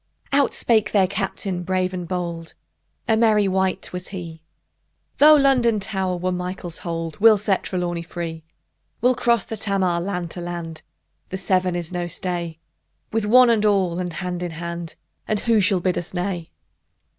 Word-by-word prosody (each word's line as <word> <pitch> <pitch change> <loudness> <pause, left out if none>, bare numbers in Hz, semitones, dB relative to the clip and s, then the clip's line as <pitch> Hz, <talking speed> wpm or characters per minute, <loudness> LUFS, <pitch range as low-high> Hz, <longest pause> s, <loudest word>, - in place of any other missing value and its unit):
Out 280 0 +3
spake 220 -3 +2
their 200 -3 +5
Captain 190 -1 -3
brave 185 +1 -1
and 180 -2 -5
bold: 170 -2 -4 0.5
A 225 - +4
merry 215 -3 +3
wight 190 -1 -1
was 180 0 -4
he: 170 -4 -8 0.8
Though 305 +1 +9
London 255 -6 +3
Tower 190 -3 -2
were 185 +1 -1
Michael's 180 -1 -4
hold, 165 0 -4
We'll 220 0 +7
set 200 -1 0
Trelawny 175 -2 -2
free! 165 -1 -6 0.6
We'll 250 +2 +4
cross 235 -1 +2
the 225 - -6
Tamar, 195 -5 0
land 180 -3 -3
to 175 - -6
land: 170 -2 -6 0.5
The 190 - -4
Severn 185 -1 +1
is 175 -1 -4
no 175 -1 -2
stay: 175 -2 -3 0.5
With 225 -1 0
"one 250 +2 +7
and 220 -2 +2
all," 190 -4 +2
and 180 -1 -3
hand 180 0 -4
in 175 - -2
hand; 170 0 -6 0.3
And 215 -1 0
who 230 -3 +3
shall 195 -1 +3
bid 180 0 0
us 175 +2 -8
nay? 175 -2 -3
185 Hz, 170 wpm, -22 LUFS, 175-210 Hz, 0.8 s, Though